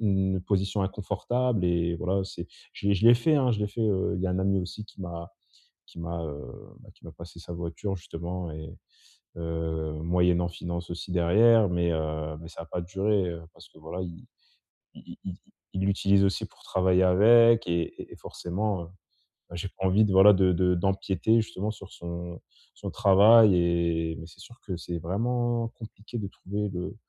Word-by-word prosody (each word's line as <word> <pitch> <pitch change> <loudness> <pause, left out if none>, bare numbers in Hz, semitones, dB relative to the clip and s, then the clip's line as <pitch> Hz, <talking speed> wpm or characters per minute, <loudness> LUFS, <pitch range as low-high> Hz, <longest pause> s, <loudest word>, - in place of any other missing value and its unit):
une 95 -3 +1
position 95 +1 0
inconfortable 105 +3 -1
et 85 -1 +1
voilà, 95 +3 -1
c'est 90 -2 -7 0.3
je - - -6
l'ai 100 - +4
je 100 - -1
l'ai 120 - +9
fait, 125 +7 +2
hein. 135 -4 +3
Je 110 - 0
l'ai 105 - 0
fait, 105 +3 -7
heu, 100 -4 +1
il 90 - -3
y - - +1
a - - -1
un 90 - -1
ami 95 0 +1
aussi 95 +4 -7
qui 105 - -15
m'a 85 0 -7 0.5
qui - - -11
m'a, 85 0 -4
heu, 75 -2 -5 0.4
bah, - - -18
qui - - -24
m'a - - -10
passé 85 0 -12
sa 85 - -9
voiture, 85 +4 -4
justement, 85 +1 -6
et 80 0 -8 0.6
heu, 80 -2 -3
moyennant 90 0 +2
finances 85 0 -6
aussi, 85 +2 -6
derrière. 105 +5 +5
Mais, 85 -1 +1
heu, 80 -1 -3
mais 80 - -10
ça 85 - -9
a - - -11
pas 90 - -4
duré, 95 +2 0
heu, 85 -1 -6
parce - - -16
que - - -19
voilà, 80 +4 -6
i 85 -2 -9 0.7
i - - -12
i 95 - -5 0.4
il 95 - -2
l'utilise 100 0 +3
aussi 95 - 0
pour - - -23
travailler 95 0 +2
avec, 115 +5 +6
et 85 -1 -2
et - - -15
et - - -10
forcément, 95 +1 -3
heu, - - -12 0.6
bah, 85 - -9
j'ai 90 +2 -4
pas 95 - -6
envie 95 +3 +4
de, 100 - -1
voilà, 95 +2 +8
de 95 -1 +3
de 90 +1 +2
d'empiéter, 95 +3 +1
justement, 110 -1 -4
sur 100 -2 -12
son 85 0 -7 0.3
son - - -6
travail 105 +1 +6
et 85 -2 +1
mais 80 - -9
c'est 90 - -16
sûr 120 +3 -14
que 95 - -3
c'est 85 0 -5
vraiment 120 +6 -1
compliqué 110 +1 -10
de 100 - -4
trouver 100 +2 -4
le 90 +1 -5
95 Hz, 200 wpm, -27 LUFS, 85-100 Hz, 0.7 s, l'ai